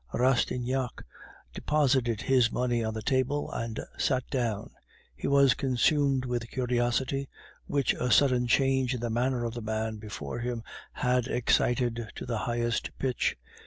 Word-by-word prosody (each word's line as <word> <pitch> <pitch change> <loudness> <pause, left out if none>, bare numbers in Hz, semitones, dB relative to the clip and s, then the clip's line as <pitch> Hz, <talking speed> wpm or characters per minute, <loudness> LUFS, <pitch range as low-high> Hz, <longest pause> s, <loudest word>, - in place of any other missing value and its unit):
Rastignac 125 0 0 0.5
deposited 130 -7 +1
his 125 -3 +3
money 120 -2 0
on 110 0 -2
the 110 - -4
table, 130 +4 0
and 115 -1 -4 0.2
sat 130 -2 +1
down. 115 -6 -2 0.4
He - - -4
was 140 -1 +5
consumed 135 +1 +2
with 120 -2 -3
curiosity, 125 +2 0 0.4
which 140 -2 +1
the 125 - -2
sudden 125 -2 +4
change 130 0 +2
in - - -4
the 120 0 -2
manner 120 +1 0
of 115 - -3
the 120 - -5
man 110 0 -2
before 105 -5 -6
him 120 -1 -3 0.3
had 125 -1 0
excited 120 -2 +1
to - - -6
the 115 -3 -2
highest 120 0 -2
pitch. 130 -3 0
125 Hz, 145 wpm, -29 LUFS, 115-130 Hz, 0.5 s, was